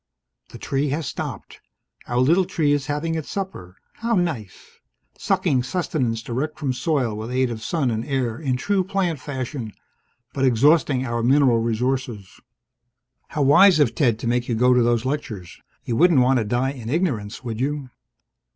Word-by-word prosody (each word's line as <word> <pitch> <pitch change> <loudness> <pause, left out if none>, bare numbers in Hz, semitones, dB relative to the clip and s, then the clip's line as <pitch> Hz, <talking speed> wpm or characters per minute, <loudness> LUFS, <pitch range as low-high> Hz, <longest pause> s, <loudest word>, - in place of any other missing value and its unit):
The - - -10
tree 140 +1 -1
has 150 +3 -2
stopped. - - -6 0.5
Our 120 - -2
little 165 +9 +4
tree 155 -4 0
is 145 -2 0
having 150 +3 -2
its 160 -2 -4
supper. 95 - -6 0.2
How 230 0 0
nice. 155 - -4 0.4
Sucking 130 -2 +1
sustenance 125 -6 -2
direct 135 +7 -3
from 140 -4 -1
soil 125 -3 0
with 110 +2 -6
aid 130 0 0
of 110 -1 -6
sun 140 -5 0
and 110 0 -2
air 130 -4 -2
in 135 -5 -1
true 195 +8 0
plant 180 -5 -1
fashion 130 -5 -5 0.6
but 135 - -2
exhausting 135 +1 +3
our 120 -1 -2
mineral 130 -1 +4
resources. 115 -3 -2 0.9
(How 150 -3 -1
wise 165 +6 +6
of 140 -6 +3
Ted 120 -9 +2
to 115 - -5
make 120 +1 0
you 120 - +1
go 125 +3 +4
to 125 - +4
those 120 0 +1
lectures! 120 - -5 0.2
You 115 - -2
wouldn't 170 -5 +5
want 130 +1 +3
to 110 - -1
die 125 +5 0
in 120 -5 -8
ignorance, 130 - -2
would 115 -2 -5
you?) 140 -1 -2
130 Hz, 170 wpm, -22 LUFS, 120-150 Hz, 0.9 s, wise